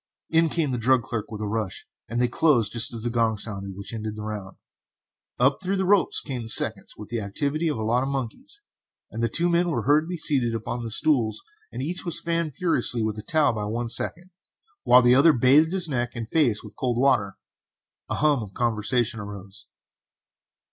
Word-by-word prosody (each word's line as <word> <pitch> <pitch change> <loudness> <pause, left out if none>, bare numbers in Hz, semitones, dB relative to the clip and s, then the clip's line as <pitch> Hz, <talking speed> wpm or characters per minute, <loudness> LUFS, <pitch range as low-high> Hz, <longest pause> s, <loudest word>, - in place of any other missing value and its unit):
In 165 0 +3
came 155 -3 -1
the 125 - -2
drug 125 +1 +3
clerk 115 -3 -5
with 110 -1 -7
a 105 - -2
rush, 105 -3 -3 0.2
and 120 +2 -2
they 125 - +3
closed 120 -5 +2
just 115 -1 +2
as 115 -2 -6
the 120 - -1
gong 115 -2 +1
sounded 100 -2 -5
which 100 +3 -7
ended 110 -1 -5
the 105 - -7
round. 105 -3 -7 0.8
Up 135 +6 +2
through 190 +1 -1
the 190 - 0
ropes 200 0 +3
came 130 -4 -5
the 110 - -8
seconds - - +3
with 105 - -10
the 115 -1 -3
activity 145 +11 -2
of 150 - -1
a 110 - -3
lot 120 +3 +1
of 135 - -2
monkeys, 140 - -6 0.5
and 115 - -5
the 115 - +1
two 170 +1 +1
men 175 0 +2
were 160 - -1
hurriedly 155 +5 +2
seated 130 -7 +1
upon 115 +1 -4
stools 110 -3 0 0.3
and - - -5
each 175 +5 -3
was 170 - +2
fanned 165 -4 -2
furiously 125 -9 +1
with 110 -1 -2
a - - -5
towel 155 +1 +2
by 105 -2 -3
one 115 +3 -3
second, 175 +9 -1 0.5
while 125 0 +6
the 120 0 +5
other 145 +5 +6
bathed 140 +6 +4
his 185 -2 0
neck 120 -4 -3
and 115 -2 -5
face 120 -7 +1
with - - -12
cold 125 -2 -2
water. 120 -7 +1 0.7
A - - -1
hum 145 -4 +2
of 100 -3 -9
conversation 115 0 0
arose. 100 -1 -9
120 Hz, 205 wpm, -24 LUFS, 110-155 Hz, 0.8 s, while